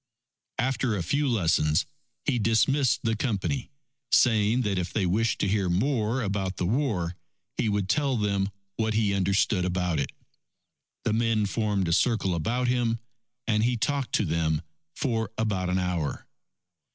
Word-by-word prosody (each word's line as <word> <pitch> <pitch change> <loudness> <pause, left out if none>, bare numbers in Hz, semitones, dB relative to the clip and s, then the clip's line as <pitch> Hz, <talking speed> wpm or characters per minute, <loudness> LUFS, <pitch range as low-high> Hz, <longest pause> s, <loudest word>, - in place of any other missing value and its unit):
After 130 -2 0
a 90 - -2
few 145 - +1
lessons, 85 - +2 0.4
he 130 -5 +1
dismissed 120 +5 +2
the 115 -1 +1
Company, 115 +3 -2 0.4
saying 115 +1 +4
that 100 -4 0
if 85 -1 -3
they 100 - 0
wished 110 +5 +1
to - - +2
hear 100 -2 +1
more 115 +4 +1
about 100 -2 -2
the 90 - -1
war, 100 - 0 0.4
he 110 - 0
would 100 -2 0
tell 140 +3 +1
them 100 -2 0 0.3
what 110 -1 0
he 105 -2 +2
understood 100 0 +2
about 90 -3 0
it. 70 - -2 0.9
The - - 0
men 115 -2 +2
formed 100 -2 0
a 85 - +1
circle 110 -3 +2
about 120 +10 0
him, 120 -2 +1 0.5
and 105 -2 +2
he 120 +1 +2
talked 140 +2 -1
to 105 - +2
them 80 -1 0 0.3
for 115 -6 -1
about 100 -5 0
an 90 - +1
hour. 90 -6 -2
105 Hz, 155 wpm, -27 LUFS, 95-120 Hz, 0.9 s, saying